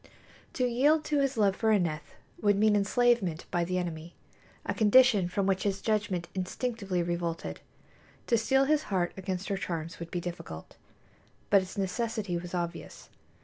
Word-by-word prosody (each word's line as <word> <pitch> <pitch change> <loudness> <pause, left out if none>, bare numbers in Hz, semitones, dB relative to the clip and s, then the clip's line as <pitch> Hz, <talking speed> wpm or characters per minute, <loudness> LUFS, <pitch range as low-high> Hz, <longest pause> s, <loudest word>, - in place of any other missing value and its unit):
To 255 - 0
yield 285 +6 +3
to 295 -1 +1
his 275 -2 0
love 200 -3 +3
for 220 +2 +1
Aneth 165 -7 0 0.3
would 205 -1 +4
mean 210 +1 +4
enslavement 205 -4 +2
by 175 - +1
the 180 +2 -1
enemy, 170 -2 -5 0.5
a - - -1
condition 215 -3 +5
from 195 +2 -1
which 190 -1 +1
his 200 -1 -1
judgment 205 -5 -1
instinctively 195 -1 -2
revolted. 170 -1 -3 0.7
To 235 - +2
steel 265 +4 +3
his 305 +1 +2
heart 180 -3 0
against 190 0 -4
her 200 - 0
charms 165 -3 -4
would 170 0 -6
be 175 - -2
difficult, 170 - -7 0.8
but 200 -1 +7
its 185 +1 -9
necessity 205 0 -2
was 175 +1 -4
obvious. 170 -1 -5
195 Hz, 160 wpm, -29 LUFS, 175-225 Hz, 0.8 s, but